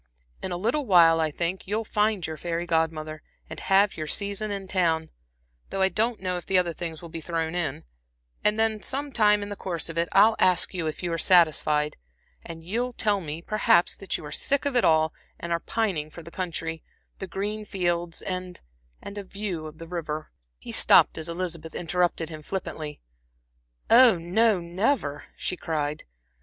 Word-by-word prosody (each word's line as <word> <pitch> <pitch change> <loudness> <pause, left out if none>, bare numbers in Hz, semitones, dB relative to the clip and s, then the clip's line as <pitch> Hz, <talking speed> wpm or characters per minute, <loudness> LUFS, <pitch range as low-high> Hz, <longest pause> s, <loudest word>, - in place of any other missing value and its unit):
In 190 - -3
a 175 - -2
little 240 +9 0
while, 165 -4 +6
I 160 -1 +1
think, 170 +5 -3
you'll 215 +3 -1
find 210 -3 +1
your 160 - -4
fairy 170 +1 -3
Godmother, 160 -2 -1 0.3
and 160 - -8
have 195 +1 +3
your 155 -1 -4
season 200 +5 -1
in 200 -1 -4
town, 165 -4 +1 0.6
though 195 - 0
I 190 - +4
don't 225 +3 0
know 185 -1 -2
if 175 - -9
the 190 - +3
other 175 -2 +1
things 165 -1 -6
will 170 - -8
be 165 0 -7
thrown 165 0 -2
in; 170 -6 -2 0.6
and 210 +1 +2
then 220 -1 +1
some 280 +2 -2
time 210 -4 +3
in 205 - -6
the 205 - -5
course 175 -4 -4
of 165 0 -3
it, 170 - 0
I'll 215 +3 +6
ask 185 +1 +3
you 170 -3 -2
if 155 +3 -5
you 175 -1 -1
are 165 - -1
satisfied, 155 -4 +3 0.5
and 165 -1 -9
you'll 240 +8 -2
tell 205 -4 +1
me 160 0 -6
perhaps, 195 -4 +3
that 195 - -3
you - - -10
are 150 - -8
sick 280 +1 +1
of 280 -2 -1
it 245 - +4
all, 160 0 +3 0.3
and 170 - -5
are 170 - +1
pining 180 -7 -1
for 170 +2 -11
the 170 - -11
country, 165 -3 -3 0.4
the 190 - -5
green 210 +3 -3
fields, 175 -4 -2
and 185 -1 -4 0.4
a - - -7
the 205 0 -6
view 190 -5 -5
of 155 0 -11
the 165 0 -9
river" 155 -3 -5 0.3
He - - -9
stopped - - +6
as 160 - -5
Elizabeth 170 -2 -4
interrupted 175 -1 0
him 155 -2 -8
flippantly. 155 -4 -5 0.9
"Oh, 235 -4 +7
no, 195 +5 +2
never," 170 - -1
she - - -2
cried. 150 -3 -3
175 Hz, 195 wpm, -26 LUFS, 160-205 Hz, 0.9 s, Oh